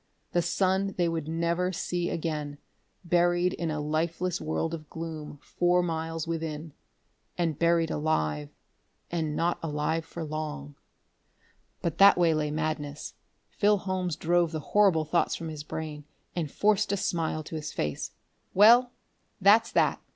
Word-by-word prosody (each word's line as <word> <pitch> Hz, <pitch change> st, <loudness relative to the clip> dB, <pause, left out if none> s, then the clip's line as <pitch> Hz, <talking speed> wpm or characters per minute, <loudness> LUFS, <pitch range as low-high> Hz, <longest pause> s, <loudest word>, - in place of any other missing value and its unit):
The 175 Hz, -, +2 dB
sun 190 Hz, +3 st, 0 dB
they 175 Hz, -2 st, +2 dB
would 165 Hz, -2 st, -2 dB
never 170 Hz, +3 st, 0 dB
see 175 Hz, -1 st, -2 dB
again, 150 Hz, -3 st, -3 dB, 0.5 s
buried 175 Hz, +1 st, +2 dB
in 170 Hz, -, -3 dB
a 155 Hz, -1 st, -2 dB
lifeless 165 Hz, +4 st, -1 dB
world 160 Hz, +1 st, -2 dB
of 155 Hz, -2 st, -7 dB
gloom 160 Hz, -2 st, -6 dB
four 175 Hz, 0 st, +2 dB
miles 165 Hz, -1 st, -3 dB
within.... 160 Hz, -2 st, -4 dB, 0.6 s
And 165 Hz, -4 st, -1 dB
buried 170 Hz, -1 st, +3 dB
alive 75 Hz, -, -1 dB, 0.6 s
and 160 Hz, -3 st, -1 dB
not 170 Hz, +2 st, 0 dB
alive 160 Hz, +1 st, -1 dB
for 165 Hz, +1 st, -7 dB
long.... 150 Hz, -, -5 dB, 1.1 s
But 170 Hz, -, -2 dB
that 200 Hz, -1 st, +8 dB
way 170 Hz, -2 st, +4 dB
lay 155 Hz, -1 st, 0 dB
madness. 150 Hz, -1 st, -3 dB, 0.4 s
Phil 205 Hz, 0 st, +3 dB
Holmes 185 Hz, -3 st, -2 dB
drove 170 Hz, +1 st, +2 dB
the 160 Hz, -, -3 dB
horrible 195 Hz, -7 st, +4 dB
thoughts 170 Hz, +3 st, +1 dB
from 165 Hz, -, -5 dB
his 155 Hz, -2 st, -6 dB
brain 150 Hz, -1 st, -6 dB, 0.3 s
and 165 Hz, -4 st, -2 dB
forced 210 Hz, -1 st, +2 dB
a 200 Hz, -, +1 dB
smile 160 Hz, -4 st, -1 dB
to 160 Hz, -, -8 dB
his 155 Hz, -1 st, -4 dB
face. 75 Hz, -1 st, -3 dB, 0.5 s
"Well, 240 Hz, +5 st, +7 dB, 0.5 s
that's 210 Hz, +4 st, +5 dB
that!" -, -, +2 dB
165 Hz, 145 wpm, -28 LUFS, 155-175 Hz, 1.1 s, that